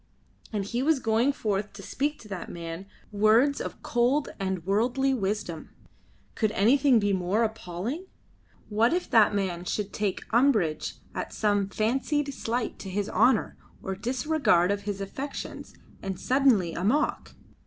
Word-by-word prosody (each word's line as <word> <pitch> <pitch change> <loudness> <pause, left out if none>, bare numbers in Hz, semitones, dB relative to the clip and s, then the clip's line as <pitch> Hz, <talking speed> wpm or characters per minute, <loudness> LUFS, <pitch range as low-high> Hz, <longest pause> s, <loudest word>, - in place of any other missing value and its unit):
And 205 -3 -2
he 235 +5 -2
was 310 +2 +3
going 230 +3 +2
forth 210 -5 -2
to 200 0 -10
speak 290 +9 -2
to 215 - -13
that 190 -3 -6
man 170 +2 -7 0.2
words 220 +7 +4
of - - -7
cold 245 +5 +1
and 190 -3 -2
worldly 245 +7 +2
wisdom. 200 -7 -3 0.6
Could 215 -2 0
anything 260 +5 +4
be 205 -2 +2
more 190 +4 +1
appalling? 220 - -4 0.6
What 225 +6 +2
if 355 +1 -1
that 215 -2 +5
man 185 -3 -1
should 205 +2 -3
take 205 -3 -2
umbrage 220 - +2 0.2
at - - -4
some 205 -2 +1
fancied 270 +7 0
slight 235 -1 -3
to 195 - -7
his 200 +2 -2
honour 240 0 +3 0.3
or 190 - -3
disregard 245 - +2
of 200 0 -1
his 200 -1 -3
affections 265 +9 -6 0.3
and 190 -1 -4
suddenly 250 -11 +3
"amok"? 230 - 0
215 Hz, 145 wpm, -27 LUFS, 195-255 Hz, 0.6 s, that